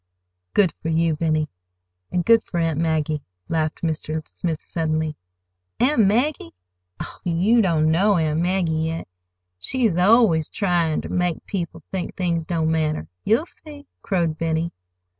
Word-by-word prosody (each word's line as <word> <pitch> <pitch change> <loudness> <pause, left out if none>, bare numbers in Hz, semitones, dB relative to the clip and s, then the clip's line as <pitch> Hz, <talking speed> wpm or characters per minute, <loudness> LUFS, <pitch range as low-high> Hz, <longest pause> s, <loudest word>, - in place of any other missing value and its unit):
"Good 190 -5 +4
for 165 - -2
you, 165 0 +2
Benny,—and 90 - -3
good 230 +1 +5
for 175 - -3
Aunt 165 -2 0
Maggie!" 155 -2 0 0.3
laughed 160 -1 -1
Mr. 155 -1 -2
Smith 165 -3 -3
suddenly. 155 -2 -2 0.6
"Aunt 245 -5 +4
Maggie? 230 - 0 0.4
Oh, - - -7
you 185 +8 +3
don't 160 -5 +2
know 195 +4 +3
Aunt 155 -1 +1
Maggie, 180 -1 +1 0.2
yet. 165 0 -4 0.5
She's 225 - +1
always 185 -5 +4
tryin' 175 -6 0
ter - - -6
make 180 -2 -1
people 170 -4 -4
think 185 -2 -4
things 170 -4 -1
don't 160 -2 0
matter. 155 -1 0 0.2
You'll 225 +10 +3
see!" 295 -4 -11 0.2
crowed 170 -5 0
Benny. 165 0 0
165 Hz, 140 wpm, -23 LUFS, 155-190 Hz, 0.6 s, good